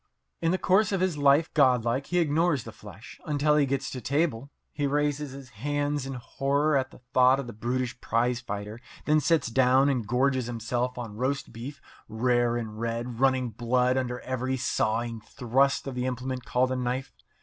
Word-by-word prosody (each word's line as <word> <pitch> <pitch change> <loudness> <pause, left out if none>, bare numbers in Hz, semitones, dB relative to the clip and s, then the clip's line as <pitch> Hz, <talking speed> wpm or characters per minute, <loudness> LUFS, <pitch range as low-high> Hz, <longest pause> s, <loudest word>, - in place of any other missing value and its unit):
In 165 - +2
the 185 - +2
course 190 +3 +3
of 195 - 0
his 185 -3 +1
life 145 +2 +3
godlike 130 -2 +2
he 180 - -1
ignores 160 -3 +2
the 115 - -8
flesh 105 +1 -13
until 150 0 +2
he 145 -2 +3
gets 135 0 -2
to 130 - -6
table. 140 -1 -1 0.2
He 145 -1 -1
raises 145 0 0
his 135 -2 -10
hands 145 +4 -2
in 135 - -4
horror 140 +5 0
at 130 -1 +1
the - - -17
thought 130 +1 +5
of 140 - -4
the 120 - -8
brutish 120 +3 -3
prize 120 +1 +1
fighter, 105 -2 -6 0.2
and - - -21
then 155 0 +4
sits 150 -2 +2
down 130 +3 +4
and 125 -6 -1
gorges 130 +1 +1
himself 120 +2 -2
on 115 -4 -6
roast 135 +3 -2
beef, 130 +6 -8 0.3
rare 120 +1 +1
and 110 -2 -6
red, 115 +1 -3
running 130 -2 +2
blood 125 +2 +1
under 125 -2 -2
every 130 0 -2
sawing 115 -2 -1
thrust 135 +4 +1
of 135 - -4
the 125 0 -2
implement 130 0 -4
called 130 +1 +1
a - - 0
knife. 125 +1 -3
130 Hz, 190 wpm, -27 LUFS, 120-140 Hz, 0.3 s, thought